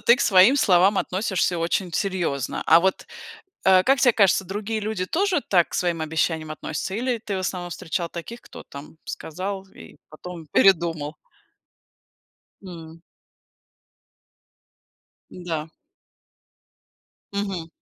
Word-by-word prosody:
ты 235 - +5
к - - -6
своим 195 +7 +6
словам 195 -3 +4
относишься 185 -2 -1
очень 170 +1 -1
серьезно. 175 - -2
А 165 +1 +7
вот, 190 +1 0 0.6
э, 190 -1 +6
как 270 0 +3
тебе 245 - +6
кажется, 195 -2 +3
другие 210 +3 -4
люди 205 -3 -2
тоже 370 - +1
так 175 -3 +2
к - - -15
своим 170 -2 -1
обещаниям 160 0 -1
относятся 155 +5 -5
или 245 +1 -1
ты 205 -3 -4
в - - -2
основном 180 -1 -4
встречал 170 -1 -4
таких, 230 +8 -8
кто - - -12
там 140 +3 -12
сказал 190 +4 -5
и - - -14
потом 165 +1 -10
передумал? 165 -5 +2 1.5
М. 165 -3 -11 2.3
Да. 165 -3 -5 1.6
Мгм. 195 -5 -3
185 Hz, 120 wpm, -23 LUFS, 165-200 Hz, 2.3 s, А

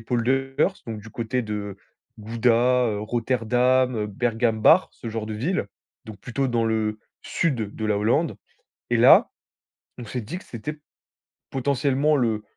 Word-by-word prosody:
polders, 135 - 0
donc 110 -2 -5
du 110 +1 -12
côté 125 +2 -2
de 105 -2 -5 0.4
Gouda, 120 +3 +2
heu, 105 -1 -2
Rotterdam, 125 +2 +1
heu, 105 - -1
Bergambacht, 115 - +3
ce 115 - -8
genre 110 -1 -4
de 110 - -5
villes, 130 - -1 0.4
donc 110 -2 -10
plutôt 130 +6 -2
dans 120 -2 +1
le 110 -1 -1 0.2
sud 120 -11 -1
de 110 - -5
la 105 -1 +1
Hollande. 120 +10 +1 0.6
Et - - +3
là, - - +7 0.7
on 120 - -8
s'est 125 +3 -4
dit 135 +11 -6
que - - -11
c'était 150 +6 -7 0.7
potentiellement 140 +2 +1
le 115 -5 0
120 Hz, 150 wpm, -24 LUFS, 110-130 Hz, 0.7 s, là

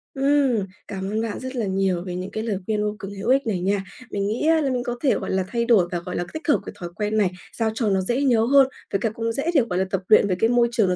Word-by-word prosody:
Ừm, 270 -6 +2 0.2
cảm 190 0 -4
ơn 220 +1 0
bạn 225 -2 -3
rất 260 +1 -6
là 235 -3 -1
nhiều 190 -2 0
về 180 -1 -5
những 185 +2 -5
cái 220 - -3
lời 215 -4 -1
khuyên 210 0 0
vô 210 0 -1
cùng 195 +1 -6
hữu 200 +3 -4
ích 265 -1 +3
này 190 -5 0
nha. 195 +1 0 0.3
Mình 200 0 -1
nghĩ 230 +9 -1
á, 325 -1 +4
là 275 - 0
mình 245 -1 -1
có 245 0 -3
thể, 275 - +3
gọi - - -4
là, 190 0 +1
thay 235 +1 -1
đổi 215 -7 +4
và, 175 - -1
gọi 180 +1 -6
là, 175 - -1
tích 315 +1 -7
hợp 295 - +4
cái - - -7
thói 175 - -5
quen 215 0 -1
này, 200 -4 +3 0.2
sao 225 -2 0
cho 225 -2 0
nó 190 -1 +2
dễ 240 +8 0
nhớ 240 -5 +4
hơn, 275 +1 +6 0.2
với 195 - +1
cả 225 - 0
cũng 230 +1 -3
dễ 275 +8 -1
để, 280 - +6
gọi 180 0 0
là, 190 - +1
tập 195 - 0
luyện 215 -1 +6
vì 185 - +1
cái 225 - +3
môi 240 -1 +4
trường 220 -5 +2
nó 180 - +1
220 Hz, 320 wpm, -23 LUFS, 195-245 Hz, 0.3 s, hơn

